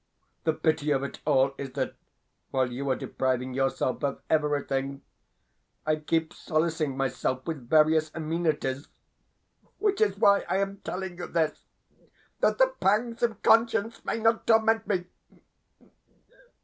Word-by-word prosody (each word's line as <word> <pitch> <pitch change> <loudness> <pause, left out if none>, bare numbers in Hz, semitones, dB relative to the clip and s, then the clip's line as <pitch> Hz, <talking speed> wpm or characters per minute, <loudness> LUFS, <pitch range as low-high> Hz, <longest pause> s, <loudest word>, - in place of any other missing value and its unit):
The 160 - +3
pity 155 -1 0
of 140 -2 +2
it 140 - -6
all 135 -2 +3
is 135 -2 -6
that, 135 -1 -2 0.6
while 130 -2 0
you 135 +3 -3
are 130 - +2
depriving 130 0 -2
yourself 135 +1 -1
of 140 -1 -1
everything, 140 -3 0 0.8
I 155 0 +2
keep 160 +1 -1
solacing 155 -3 -1
myself 130 -1 -1
with 140 -8 -5
various 155 0 +4
amenities 155 -4 -1 0.9
which 415 0 0
is 435 - +2
why 200 0 +5
I - - +2
am 195 0 -1
telling 185 -2 -6
you 175 - -4
this, 160 -2 -1 0.7
that - - +2
the - - +4
pangs 230 +4 +1
of 230 -4 -1
conscience 225 -1 +3
may - - -2
not 225 0 +1
torment 225 0 +3
me. 185 -4 0
155 Hz, 135 wpm, -27 LUFS, 135-200 Hz, 0.9 s, why